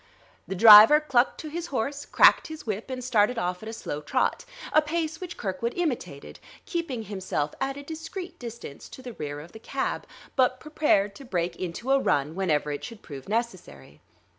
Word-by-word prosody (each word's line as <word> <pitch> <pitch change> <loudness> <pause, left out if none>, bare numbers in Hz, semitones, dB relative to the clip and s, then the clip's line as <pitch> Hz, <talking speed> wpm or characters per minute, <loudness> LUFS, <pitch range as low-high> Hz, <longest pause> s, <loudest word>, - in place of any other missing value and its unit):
The 190 - -4
driver 220 +8 +10
clucked 265 -5 +1
to 315 - -7
his 340 +2 -5
horse, 275 +3 -3
cracked - - +5
his 315 -1 -9
whip, 215 +2 -4
and 255 -1 -5
started 235 -1 +2
off 180 -2 -2
at 220 - -7
a - - -5
slow 150 -9 -5
trot: - - -1 0.3
a 310 - +6
pace 320 +1 -3
which 355 -1 -7
Kirkwood 205 +5 -3
imitated, 245 - -4 0.3
keeping 335 - -3
himself 190 -8 -3
at 270 +1 -2
a 285 - -8
discreet 325 +5 -7
distance 235 - -9
to 260 - -12
the 245 -2 -7
rear 145 -5 -6
of 160 +4 -12
the 220 - -11
cab, 270 +4 -3 0.3
but 255 -1 +2
prepared 250 -9 +1
to - - -11
break 175 -7 -2
into 185 +10 -4
a 275 - +5
run 145 - 0
whenever 155 -5 0
it 145 - -5
should 230 -3 -9
prove 140 +1 -10
necessary. 235 +2 -4
235 Hz, 190 wpm, -26 LUFS, 185-285 Hz, 0.3 s, driver